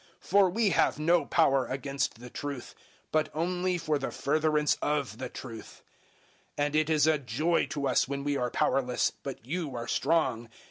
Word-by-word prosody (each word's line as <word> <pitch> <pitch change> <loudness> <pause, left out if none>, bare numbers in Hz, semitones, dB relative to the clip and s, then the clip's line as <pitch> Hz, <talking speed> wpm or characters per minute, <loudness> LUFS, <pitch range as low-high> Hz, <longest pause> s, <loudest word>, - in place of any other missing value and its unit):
013:008 - - -20
For 195 -1 +6
we 215 +3 +2
have - - +2
no 165 +3 +3
power 135 -5 +3
against 135 -2 -2
the 125 0 -10
truth, 140 -4 -6 0.4
but 155 0 +1
only 180 +2 0
for 155 -3 -1
the 135 - -3
furtherance 150 +1 +1
of 145 -3 -1
the 130 - -4
truth; 115 -4 -10 0.7
013:009 145 - +2
and 145 +1 -2
it 155 0 +2
is 155 -2 +4
a 155 -1 +3
joy 140 +7 0
to 140 -2 -2
us 130 - +2
when 140 0 -3
we 145 0 0
are 125 -2 0
powerless, 125 0 +1
but 135 -4 -7
you 150 -1 -3
are 120 0 -5
strong. 135 -7 +1
145 Hz, 185 wpm, -29 LUFS, 135-160 Hz, 0.7 s, For